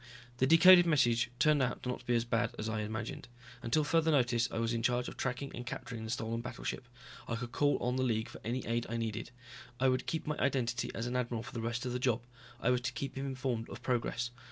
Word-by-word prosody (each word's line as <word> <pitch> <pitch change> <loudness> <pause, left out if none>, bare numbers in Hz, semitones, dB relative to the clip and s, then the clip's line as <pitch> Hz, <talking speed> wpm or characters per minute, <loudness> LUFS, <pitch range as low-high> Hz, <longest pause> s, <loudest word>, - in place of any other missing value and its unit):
The 130 - +3
decoded 175 +3 +8
message 120 -6 +3
turned 150 -1 +4
out 125 -1 -1
not 125 0 -2
to - - -17
be 120 - +3
as 115 0 +1
bad 115 -1 0
as 110 - -3
I 110 0 -1
had 105 - -2
imagined. 110 +2 -5 0.3
Until 120 +7 +1
further 160 +2 +2
notice 125 -5 +3
I - - -4
was 115 0 0
in 115 - -1
charge 125 +1 +1
of - - -7
tracking 130 +2 -3
and 120 - -5
capturing 115 -2 -6
the - - -6
stolen 115 0 -2
battleship. 125 +1 -5 0.4
I 115 - -1
could 120 +1 -5
call 145 +2 +2
on 125 +1 -1
the 130 - +1
League 110 -3 0
for - - -11
any 120 +3 -2
aid 115 +1 -1
I 115 - -2
needed. 115 0 -3 0.5
I 130 0 +4
would 130 0 0
keep 160 -1 -2
my 150 -1 -2
identity 125 -4 0
as 115 - -2
an 125 +1 -3
admiral 120 -2 -1
for 130 - -10
the 115 - -3
rest 120 +2 -2
of 125 - -2
the 125 - -1
job. 125 -2 +1 0.4
I 125 - +2
was 125 -1 +2
to 120 - -3
keep 135 - -4
him 135 +1 -3
informed 130 -3 -2
of - - -9
progress. 120 -1 -1
120 Hz, 250 wpm, -33 LUFS, 115-130 Hz, 0.5 s, decoded